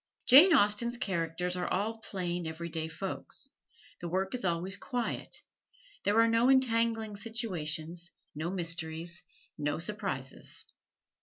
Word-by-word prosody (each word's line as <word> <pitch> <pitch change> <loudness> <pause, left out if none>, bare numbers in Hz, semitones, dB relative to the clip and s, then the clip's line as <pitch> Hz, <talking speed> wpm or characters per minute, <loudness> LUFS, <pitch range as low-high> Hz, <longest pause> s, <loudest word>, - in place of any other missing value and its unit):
Jane 295 +9 +9
Austen's 235 -2 +4
characters 180 -3 -1
are 180 -1 -2
all 220 +4 -1
plain, 175 -5 -3
every 165 +1 -5
day 160 -1 -2
folks. 165 +4 -5 0.5
The 175 - -5
work 190 +2 -1
is 250 - -1
always 180 +2 0
quiet. 245 +3 -3 0.6
There 205 +2 +4
are 230 - +6
no 230 +2 +4
entangling 230 -4 +3
situations, 175 -7 -2 0.2
no 155 +3 -3
mysteries, 170 -1 -1 0.4
no 145 0 0
surprises. 185 -8 -3
185 Hz, 125 wpm, -31 LUFS, 165-225 Hz, 0.6 s, Jane